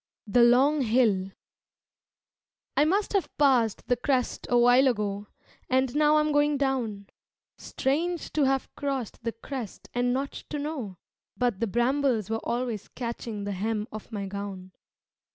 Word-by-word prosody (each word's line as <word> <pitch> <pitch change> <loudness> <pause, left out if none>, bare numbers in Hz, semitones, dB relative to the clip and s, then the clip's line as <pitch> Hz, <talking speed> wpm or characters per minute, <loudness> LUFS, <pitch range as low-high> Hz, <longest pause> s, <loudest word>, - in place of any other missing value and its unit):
The 230 +3 +3
Long 265 +5 +5
Hill 220 -6 +2 1.5
I 295 - +4
must 395 +7 +1
have 395 -3 +1
passed 255 -7 +3
the 245 - +3
crest 250 +1 -1
a 245 - +4
while 245 +3 +6
ago 205 -4 -1 0.4
And 260 0 +1
now 300 0 +4
I 305 - +5
am 305 0 0
going 290 0 +3
down 245 -7 -1 0.5
Strange 330 +6 -2
to 300 -3 +3
have 270 0 0
crossed 270 -6 -4
the 230 - -1
crest 235 -1 -7
and 245 0 +1
not 270 +2 -1 0.2
to 300 - -3
know, 285 - -4 0.4
But 240 -6 0
the 230 - 0
brambles 240 -1 +1
were 225 - -1
always 235 -4 -2
catching 230 -3 -5
the 200 - -3
hem 210 +2 -2
of 215 +2 -9
my 205 -2 -3
gown. 195 -1 -6
245 Hz, 150 wpm, -27 LUFS, 215-275 Hz, 1.5 s, while